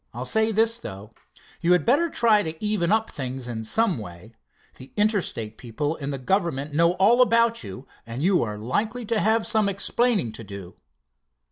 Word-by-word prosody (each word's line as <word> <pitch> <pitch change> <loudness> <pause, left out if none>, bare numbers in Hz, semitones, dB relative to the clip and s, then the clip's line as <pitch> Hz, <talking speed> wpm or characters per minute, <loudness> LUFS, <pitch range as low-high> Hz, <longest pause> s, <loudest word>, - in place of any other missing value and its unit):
I'll 125 +2 -4
say 220 - +2
this, 225 +2 +1
though: 100 - -9 0.5
You 175 +1 +3
had 180 -4 +2
better 295 +8 +3
try 225 -7 +3
to 160 -4 -4
even 210 -5 0
up 220 +1 +1
things 130 -2 -5
in 115 -2 -4
some 195 - +1
way. 90 +2 -10 0.4
The 130 - -13
Interstate 195 - -1
people 145 +6 -3
and 140 -2 -5
the 140 - -3
government 150 -2 -1
know 170 +3 +3
all 205 +7 +4
about 230 - +3
you, 100 +6 -9 0.2
and 115 +5 -6
you 185 0 +3
are 105 -2 -3
likely 215 - -2
to 225 0 0
have 220 +2 +2
some 215 -2 +1
explaining 200 - 0
to 115 - -9
do." 100 -3 -9
170 Hz, 180 wpm, -24 LUFS, -, 0.5 s, all